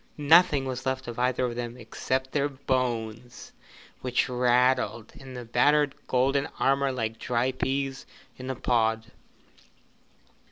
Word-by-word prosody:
Nothing 150 -1 +5
was 130 0 -4
left 130 -1 -2
of 120 0 -6
either 125 0 +1
of 120 -1 -3
them 120 0 -5
except 130 +3 -3
their 145 -1 0
bones, 125 -4 -3 0.5
which 125 -1 0
rattled 125 -2 +1
in 130 -1 -11
the 125 -1 -7
battered 145 +4 +3
golden 135 +2 +1
armour 135 0 +2
like 115 -3 -3
dry 125 +1 0
peas 135 +1 -3 0.3
in 130 0 -8
a 130 - -2
pod. 115 -2 0
130 Hz, 130 wpm, -27 LUFS, 120-135 Hz, 0.5 s, Nothing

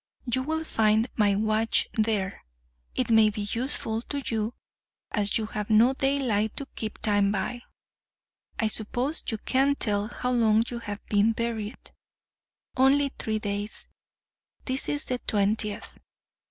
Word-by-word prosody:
You 255 +1 +1
will 320 +4 -2
find 220 -5 +2
my 205 -3 +3
watch 215 +2 +2
there—it 190 - -3
may 220 -1 +6
be 210 -1 -4
useful 230 -2 -1
to 280 +3 -4
you, 220 +1 -1 0.6
as 205 -2 +1
you 220 - -2
have 210 -1 -5
no 225 +4 +5
daylight 260 -6 0
to 280 - -3
keep 215 -1 -4
time 205 -2 +2
by. 210 +5 -2 1.0
I 225 - +1
suppose 245 +7 -2
you 220 - -1
can't 270 +5 +1
tell 205 -1 +1
how 250 +2 -3
long 225 -2 +4
you 240 - -4
have 205 -3 -7
been 210 +2 +3
buried—only 240 +4 -2
three 220 -1 -1
days—this 210 +5 -6
is 290 0 +1
the 250 -1 -2
twentieth. 210 0 0
220 Hz, 130 wpm, -27 LUFS, 210-250 Hz, 1.0 s, may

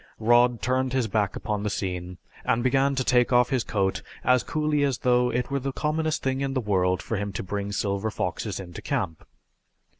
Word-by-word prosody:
Rod 120 0 +3
turned 130 +1 +1
his 130 -3 +1
back 105 -1 0
upon 105 -2 -2
the 105 - -1
scene 90 -2 -4 0.3
and 120 - +1
began 135 +2 +2
to 130 - 0
take 125 0 +3
off 125 0 +4
his 130 -3 +1
coat 95 -2 -1 0.2
as 125 0 +4
coolly 150 -2 0
as 135 -4 +1
though 125 0 +3
it 125 +3 -2
were 140 - +1
the 135 +1 -3
commonest 155 +2 -1
thing 130 0 0
in 135 0 -2
the - - +2
world 95 -5 +1
for 115 - -2
him 100 0 -3
to - - -4
bring 100 +1 -3
silver 100 +1 -1
foxes 100 0 -3
into 90 -3 -8
camp. 100 - -2
120 Hz, 205 wpm, -26 LUFS, 100-130 Hz, 0.3 s, off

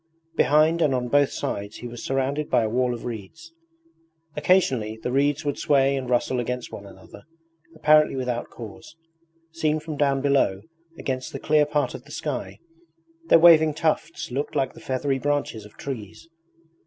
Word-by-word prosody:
Behind 155 +5 +3
and 140 -5 +3
on 125 -1 -2
both 145 0 +3
sides 100 +1 -4
he 120 - -7
was 120 0 -9
surrounded 135 +3 -1
by 125 -2 +3
a 110 - -1
wall 125 +1 0
of 115 - -9
reeds. 120 +9 -8 0.8
Occasionally 135 - +2
the 115 +2 -4
reeds 140 +2 +1
would 145 0 -2
sway 140 -1 +3
and 130 -2 -4
rustle 125 +1 +1
against 125 0 -4
one 100 - -9
another 100 - -14 0.5
apparently 155 -2 +4
without 125 -2 -3
cause. 115 +6 -11 0.6
Seen 155 -1 0
from 155 -1 -7
down 140 -2 +2
below, 135 -9 +1 0.3
against 130 +4 -4
the 135 - -5
clear 150 0 +3
part 150 -1 0
of - - -9
the - - -14
sky, - - -4 0.7
their - - +7
waving 160 -2 +6
tufts 160 -2 -1
looked 140 +4 -3
like 135 - 0
the - - -13
feathery 135 +1 -1
branches 145 -7 -2
of 105 - -16
trees. 125 0 -7
135 Hz, 165 wpm, -24 LUFS, 125-150 Hz, 0.8 s, their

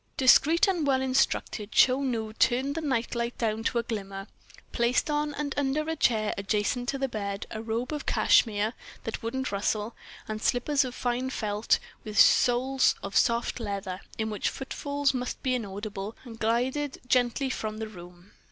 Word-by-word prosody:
Discreet 300 - +5
and 350 -6 0
well 265 -1 +3
instructed, 255 -5 0
Chou 265 +2 +4
Nu 225 -5 -2
turned 260 +5 +2
the 325 - -3
night 260 -6 -1
light 235 0 -2
down 225 -1 -1
to - - +1
a 235 - +1
glimmer, 195 -4 -5 0.5
placed 235 +5 +1
on 295 0 -1
and 285 -1 -3
under 290 +2 0
a 320 - -1
chair 220 -7 +2
adjacent 210 +5 -1
to 275 - -1
the 270 0 -1
bed 200 -4 -4
a 220 - -4
robe 230 +5 -3
of 300 - -5
cashmere 215 0 +3 0.3
that 225 - -4
wouldn't 265 +4 -3
rustle, 210 +2 -1 0.3
and 215 -1 -4
slippers 275 +5 +2
of 255 -1 -6
fine 250 +1 -1
felt 215 -3 +1 0.3
with 215 -2 -2
soles 255 +2 +4
of 200 0 -6
soft 235 +1 +2
leather, 200 -4 -4 0.2
in 220 -1 -2
which 210 - -1
footfalls 285 +1 -2
must 250 -1 -4
be 255 - +1
inaudible—and 215 +1 -6
glided 260 +6 0
gently 255 +2 +2
from 215 -3 -4
the 220 0 -4
room. 180 -1 -13
235 Hz, 170 wpm, -28 LUFS, 215-265 Hz, 0.5 s, Discreet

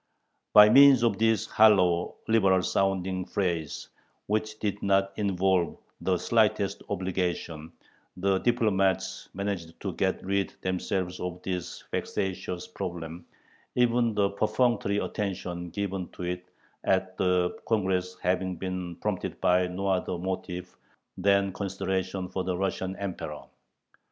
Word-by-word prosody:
By 105 0 +10
means 135 0 +8
of 110 -4 +2
this 110 -3 +3
hollow, 90 -5 +4
liberal 95 -5 +4
sounding 95 -1 0
phrase, 85 -5 -2 0.4
which 110 +1 -1
did 105 -1 -2
not 100 0 +2
involve 95 -3 +1 0.2
the - - +1
slightest - - +1
obligation, 90 -3 -2 0.5
the 95 +1 +2
diplomats 105 -6 +1
managed 95 -4 -4
to 95 -4 -4 0.3
rid 100 0 -1
themselves 90 0 -2
of 90 0 -4
this 90 -2 -4
vexatious 90 -2 -3
problem, 85 -3 -6 0.5
even 120 -2 +2
the 100 -1 +2
perfunctory 110 0 +1
attention 90 -4 -3
given 95 0 -3
to - - -7
it 90 0 -4 0.3
at 95 -1 +1
the 90 -1 +2
Congress 95 -4 0
having 90 +1 0
been 90 -1 -4
prompted - - -3
by 90 0 +3
no 90 +2 -4
other 95 -2 0
motive 90 0 -5 0.4
than 100 0 +2
consideration 95 -1 -2
for 95 0 -3
the 90 -1 -2
Russian 95 0 -2
Emperor. 90 -6 -5
95 Hz, 120 wpm, -28 LUFS, 90-100 Hz, 0.5 s, By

